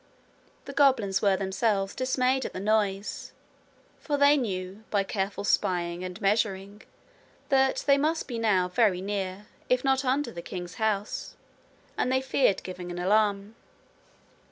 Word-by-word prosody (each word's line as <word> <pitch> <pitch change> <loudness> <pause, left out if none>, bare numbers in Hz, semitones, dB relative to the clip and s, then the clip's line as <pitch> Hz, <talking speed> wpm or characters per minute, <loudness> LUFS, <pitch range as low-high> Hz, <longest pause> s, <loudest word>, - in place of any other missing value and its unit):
The 280 - -7
goblins 260 -9 +3
were 195 -2 +3
themselves 195 +1 0
dismayed 255 0 +1
at - - -5
the - - -5
noise, 205 -1 -1 0.7
for 290 -2 -2
they 285 +1 +6
knew, 195 -5 -3
by 200 -2 +1
careful 195 0 -3
spying 175 -3 0
and 185 +1 -6
measuring, 200 -1 -1 0.7
that 265 -1 +2
they 280 0 +4
must 315 +3 0
now 220 -7 +1
be 180 - -17
very 200 -4 +3
near, 195 0 -4 0.2
if 250 0 +2
not 265 0 +2
under 265 0 0
the 170 - -7
king's 175 -1 -7
house, 210 -1 -2 0.6
and 250 - +1
they 260 - +3
feared 260 -6 +1
giving 180 -1 -7
an 175 - -6
alarm. 200 +2 +1
205 Hz, 145 wpm, -27 LUFS, 190-255 Hz, 0.7 s, they